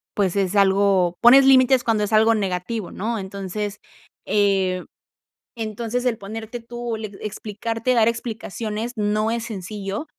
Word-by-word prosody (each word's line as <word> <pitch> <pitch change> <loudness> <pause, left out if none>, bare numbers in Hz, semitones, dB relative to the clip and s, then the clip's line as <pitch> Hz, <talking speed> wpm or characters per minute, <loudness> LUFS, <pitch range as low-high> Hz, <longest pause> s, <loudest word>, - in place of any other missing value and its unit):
pues 195 -2 +1
es 195 0 0
algo 195 -3 +3
Pones 265 +3 +8
límites 260 -1 +5
cuando 220 -2 +1
es 210 - -5
algo 220 +1 +5
negativo, 195 +1 -3
¿no? 225 +2 -3
Entonces, 200 +1 -5 0.5
eh, 195 -3 +1 0.7
entonces 225 +3 -3
el 240 -3 +1
ponerte 220 +3 -7
tú, 240 0 -5
le 215 -1 -5 0.2
explicarte, 225 +3 -3
dar 225 -1 +4
explicaciones 225 -1 -3
no 215 +1 0
es 230 -1 -2
sencillo, 200 - -5
215 Hz, 135 wpm, -22 LUFS, 200-230 Hz, 0.7 s, Pones